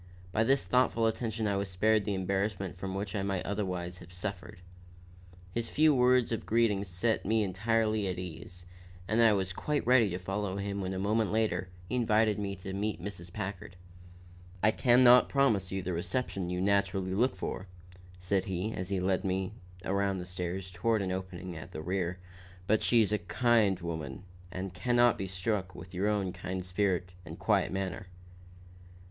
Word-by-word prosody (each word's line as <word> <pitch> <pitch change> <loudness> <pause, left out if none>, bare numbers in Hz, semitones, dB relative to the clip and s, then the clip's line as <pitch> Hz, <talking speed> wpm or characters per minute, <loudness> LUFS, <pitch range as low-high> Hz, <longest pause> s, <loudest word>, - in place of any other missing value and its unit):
By 110 - +2
this 135 +4 +2
thoughtful 125 -2 +2
attention 110 0 -1
I 100 -1 +1
was 100 0 -2
spared 105 +3 +2
the 105 - -1
embarrassment 95 0 -1
from 95 +1 -5
which 100 +2 -3
I 100 - 0
might 95 -2 -2
otherwise 90 -3 -3
have 85 - -13
suffered. 90 0 -5 1.0
His 115 +1 -2
few 155 0 +4
words 125 -2 +4
of 115 - -2
greeting 110 -3 +2
set 100 +5 0
me 110 +2 +2
entirely 110 +1 +1
at 90 - -2
my - - -3
ease, 90 +1 -9 0.4
and 110 +2 +2
I 115 -2 +6
was 95 -2 -1
quite 150 +9 -1
ready 120 -4 +5
to 90 - -3
follow 95 +1 -3
him 100 0 -3
when 95 0 -3
a - - -3
moment 105 +2 +1
later 105 -5 0 0.2
he - - -6
invited 110 -2 +3
me 100 -1 -3
to 95 0 -7
meet 105 -1 -2
Mrs. 90 -2 -7
Packard. 95 -3 -6 0.9
"I 110 - +6
can 125 +2 +4
not 125 0 +7
promise 110 -10 +2
you 95 0 -2
just - - -12
the 90 - -1
reception 95 0 -2
you 90 0 -2
naturally 95 -1 +1
look 120 +3 +2
for," 95 +1 -5 0.5
said 90 +1 0
he, 95 +3 -2
as 90 +1 -4
he 100 -2 0
led 95 0 +1
me 95 -1 -1 0.3
around 100 0 +1
the 90 - -5
stairs 90 +1 -4
toward 105 +4 +1
an 95 - -2
opening 95 -1 -5
at 80 - -9
their 80 - -5
rear, 90 0 -1 0.5
"but 110 +3 +2
she's 110 -3 +3
a 105 - +2
kind 105 +1 +2
woman 80 -6 -5 0.3
and 95 0 -5
can 110 +7 0
not 120 0 +6
but - - -13
be 95 - -2
struck 95 0 -2
with 90 - -10
your 95 +3 0
own 100 -4 0
kind 90 0 -5
spirit 90 -1 0
and 85 -2 -9
quiet - - +2
manner." 95 0 -3
95 Hz, 190 wpm, -31 LUFS, 90-110 Hz, 1.0 s, not